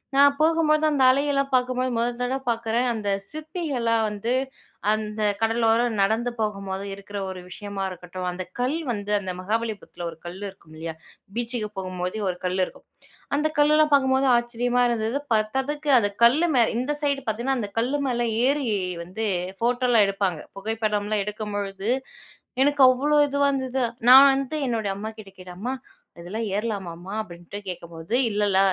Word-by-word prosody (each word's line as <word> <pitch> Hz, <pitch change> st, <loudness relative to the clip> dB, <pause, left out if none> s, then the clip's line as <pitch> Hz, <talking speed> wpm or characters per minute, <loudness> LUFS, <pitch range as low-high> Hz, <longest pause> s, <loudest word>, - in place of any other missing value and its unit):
நான் 280 Hz, 0 st, +6 dB
போகும்போது 315 Hz, -1 st, +3 dB
அந்த 280 Hz, -3 st, +2 dB
அலையெல்லாம் 275 Hz, 0 st, +1 dB
பாக்கும்போது, 255 Hz, 0 st, +1 dB
முதல் 240 Hz, +1 st, 0 dB
தடவை 260 Hz, +2 st, -1 dB
பார்க்குறேன். 230 Hz, +1 st, 0 dB
அந்த 210 Hz, -3 st, -3 dB, 0.2 s
சிற்பிகள்லாம் 290 Hz, -8 st, -1 dB
வந்து, 210 Hz, +4 st, -2 dB, 0.6 s
அந்த 215 Hz, 0 st, -3 dB, 0.2 s
கடலோரம் 225 Hz, 0 st, +2 dB
நடந்து 225 Hz, +5 st, +1 dB
போகும்போது 195 Hz, -2 st, -3 dB
இருக்கிற 200 Hz, +1 st, -8 dB
ஒரு 185 Hz, -1 st, -7 dB
விஷயமா 200 Hz, 0 st, -5 dB
இருக்கட்டும், 180 Hz, 0 st, -6 dB
அந்த 185 Hz, +1 st, -5 dB, 0.2 s
கல் 260 Hz, +6 st, +1 dB
வந்து, 205 Hz, -2 st, -4 dB
அந்த 185 Hz, -2 st, -4 dB
மகாபலிபுரத்துல 210 Hz, -4 st, -3 dB
ஒரு 160 Hz, -, -14 dB
கல் 180 Hz, +3 st, -7 dB
இருக்கும் 165 Hz, -4 st, -17 dB
இல்லையா? 160 Hz, 0 st, -5 dB, 0.4 s
பீச்சுக்கு 235 Hz, -3 st, -1 dB
போகும்போது 185 Hz, +1 st, -4 dB
ஒரு 180 Hz, -, -3 dB
கல் 185 Hz, +1 st, 0 dB
இருக்கும், -, -, -14 dB, 0.5 s
அந்த 300 Hz, +2 st, +2 dB
கல்லெலாம் 300 Hz, +1 st, +4 dB
பார்க்கும்போது 265 Hz, -1 st, +4 dB
ஆச்சரியமா 245 Hz, +1 st, 0 dB
இருந்தது, 230 Hz, +4 st, -1 dB, 0.2 s
பத்தாததுக்கு 265 Hz, +7 st, -1 dB
அது 205 Hz, -, +1 dB, 0.2 s
கல்லு 310 Hz, +9 st, +4 dB
மேல, 235 Hz, -2 st, +5 dB
இந்த 265 Hz, +4 st, -1 dB
சைட் 280 Hz, -2 st, 0 dB
பாத்தீங்கன்னா, 245 Hz, +4 st, -1 dB
அந்த 205 Hz, -, -5 dB
கல்லு 260 Hz, +5 st, 0 dB
மேல 240 Hz, -1 st, -1 dB, 0.3 s
ஏறி 280 Hz, -2 st, 0 dB, 0.4 s
வந்து 220 Hz, +5 st, -4 dB, 0.3 s
ஃபோட்டோலாம் 240 Hz, -2 st, +3 dB
எடுப்பாங்க. 195 Hz, -5 st, -1 dB, 0.2 s
புகைப்படம்லாம் 210 Hz, 0 st, -1 dB
எடுக்கும்பொழுது, 205 Hz, -1 st, -4 dB, 0.7 s
எனக்கு 285 Hz, 0 st, +3 dB
அவ்வளோ 290 Hz, +4 st, +2 dB
இதுவா 280 Hz, 0 st, +2 dB
இருந்தது, 260 Hz, -1 st, -1 dB, 0.3 s
நான் 265 Hz, +2 st, +10 dB
வந்து 275 Hz, +2 st, -2 dB
என்னுடைய 225 Hz, -5 st, -1 dB
அம்மாகிட்ட 215 Hz, 0 st, -8 dB
கேட்டேன், 180 Hz, -1 st, -10 dB
"அம்மா 245 Hz, +6 st, -2 dB, 0.5 s
இதெல்லாம் 215 Hz, +6 st, -4 dB
ஏறலாமாம்மா" 195 Hz, -4 st, -4 dB
அப்படின்ட்டு 175 Hz, 0 st, -9 dB
கேட்கும்போது, 170 Hz, +2 st, -5 dB
"இல்லல 205 Hz, -2 st, +2 dB
225 Hz, 145 wpm, -24 LUFS, 200-260 Hz, 0.7 s, நான்